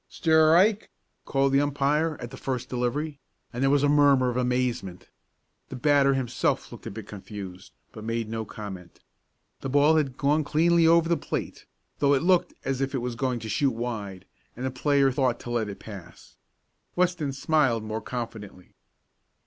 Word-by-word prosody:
"Strike!" 165 Hz, +6 st, +3 dB, 0.4 s
called 135 Hz, 0 st, +1 dB
the 140 Hz, -, +5 dB
umpire, 145 Hz, +2 st, 0 dB
at 120 Hz, -1 st, -7 dB
the -, -, -8 dB
first 130 Hz, -2 st, -4 dB
delivery, 140 Hz, +4 st, -2 dB, 0.3 s
and 120 Hz, -, -4 dB
there 135 Hz, -, +3 dB
was 140 Hz, 0 st, +3 dB
a -, -, +4 dB
murmur 140 Hz, -3 st, +4 dB
of -, -, -6 dB
amazement. 125 Hz, -7 st, -2 dB, 0.6 s
The -, -, -6 dB
batter 140 Hz, +1 st, +3 dB
himself 130 Hz, -3 st, -1 dB
looked -, -, -10 dB
a -, -, -3 dB
bit 105 Hz, 0 st, -9 dB
confused, 100 Hz, -2 st, -9 dB, 0.2 s
but 110 Hz, -, -10 dB
made 115 Hz, 0 st, -2 dB
no 110 Hz, 0 st, -3 dB
comment. 95 Hz, -5 st, -9 dB, 0.6 s
The 135 Hz, -, -5 dB
ball 145 Hz, +4 st, +4 dB
had 140 Hz, -4 st, -1 dB
gone 150 Hz, +2 st, +2 dB
cleanly 165 Hz, +3 st, +3 dB
over 165 Hz, 0 st, +5 dB
the 170 Hz, 0 st, +2 dB
plate, -, -, -5 dB, 0.3 s
though 140 Hz, 0 st, +4 dB
it 135 Hz, -, 0 dB
looked 180 Hz, 0 st, +2 dB
as 135 Hz, 0 st, -1 dB
if 135 Hz, +1 st, -1 dB
it -, -, +1 dB
was 125 Hz, 0 st, -3 dB
going 125 Hz, +1 st, -1 dB
to 110 Hz, -, -6 dB
shoot 130 Hz, +5 st, +1 dB
wide, 105 Hz, -6 st, -5 dB, 0.3 s
and 125 Hz, -, -4 dB
the 130 Hz, -, -1 dB
player 140 Hz, +2 st, +2 dB
had 130 Hz, -, -5 dB
thought 130 Hz, -4 st, +1 dB
to 120 Hz, -, -7 dB
let 115 Hz, -3 st, -1 dB
it 100 Hz, -, -7 dB
pass. 90 Hz, -6 st, -12 dB, 0.6 s
Weston 175 Hz, -5 st, 0 dB
smiled 135 Hz, -5 st, +1 dB
more 110 Hz, +1 st, -4 dB
confidently. 110 Hz, -6 st, -7 dB
130 Hz, 180 wpm, -26 LUFS, 115-145 Hz, 0.6 s, the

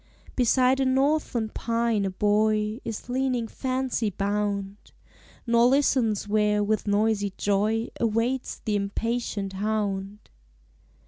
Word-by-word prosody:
Beside 255 Hz, +1 st, +3 dB
a 270 Hz, -, +2 dB
northern 265 Hz, -3 st, +1 dB
pine 230 Hz, -2 st, 0 dB
a -, -, 0 dB
boy 210 Hz, +2 st, +1 dB
Is 225 Hz, -1 st, -6 dB
leaning 250 Hz, -2 st, -1 dB
fancy 255 Hz, -3 st, -2 dB
bound. 200 Hz, 0 st, -2 dB, 0.7 s
Nor 235 Hz, 0 st, +4 dB
listens 250 Hz, -6 st, +2 dB
where 210 Hz, 0 st, +2 dB
with 215 Hz, +1 st, -1 dB
noisy 205 Hz, -1 st, +1 dB
joy 215 Hz, +3 st, 0 dB
Awaits 235 Hz, +3 st, -1 dB
the 215 Hz, -, 0 dB
impatient 205 Hz, 0 st, -2 dB
hound. 205 Hz, 0 st, -3 dB
220 Hz, 110 wpm, -26 LUFS, 205-240 Hz, 0.7 s, Nor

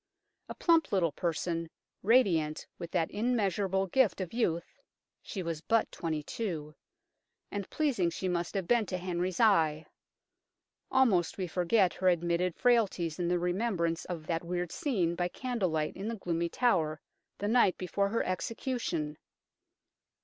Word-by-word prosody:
A -, -, -5 dB
plump 330 Hz, -2 st, +3 dB
little 180 Hz, -5 st, +2 dB
person, 165 Hz, +1 st, -2 dB, 0.3 s
radiant 180 Hz, -9 st, +3 dB
with 170 Hz, -, -6 dB
that 165 Hz, -2 st, 0 dB
immeasurable 200 Hz, -4 st, +1 dB
gift 220 Hz, +2 st, +2 dB
of 185 Hz, 0 st, -4 dB
youth 170 Hz, -8 st, -1 dB, 0.4 s
(she 190 Hz, -, -5 dB
was 165 Hz, -2 st, -3 dB
but 225 Hz, +5 st, +1 dB
twenty 155 Hz, -3 st, -3 dB
two), 155 Hz, -6 st, -4 dB, 0.8 s
and 200 Hz, -2 st, -4 dB
pleasing 255 Hz, -, +1 dB
she 185 Hz, +3 st, -4 dB
must 175 Hz, +1 st, -2 dB
have 190 Hz, -3 st, -1 dB
been 235 Hz, -2 st, +3 dB
to 185 Hz, -, -2 dB
Henry's 180 Hz, 0 st, -2 dB
eye. 165 Hz, -9 st, +4 dB, 1.0 s
Almost 225 Hz, -10 st, +3 dB
we 190 Hz, -, -1 dB
forget 180 Hz, +2 st, +2 dB
her 185 Hz, -, -1 dB
admitted 175 Hz, 0 st, +1 dB
frailties 200 Hz, -10 st, +2 dB
in 175 Hz, -, 0 dB
the 175 Hz, +1 st, +2 dB
remembrance 175 Hz, -2 st, -1 dB
of 170 Hz, -4 st, -5 dB
that 165 Hz, +1 st, -1 dB
weird 175 Hz, 0 st, -3 dB
scene 205 Hz, -, 0 dB
by 175 Hz, 0 st, 0 dB
candle 235 Hz, -1 st, -2 dB
light 155 Hz, -1 st, -1 dB
in 195 Hz, +3 st, -5 dB
the 230 Hz, -, -2 dB
gloomy 170 Hz, -4 st, -2 dB
Tower, 160 Hz, -10 st, +1 dB, 0.4 s
the 205 Hz, -, -2 dB
night 220 Hz, -4 st, +4 dB
before 200 Hz, +2 st, 0 dB
her 230 Hz, -, 0 dB
execution. 185 Hz, -, -3 dB
180 Hz, 150 wpm, -31 LUFS, 170-215 Hz, 1.0 s, eye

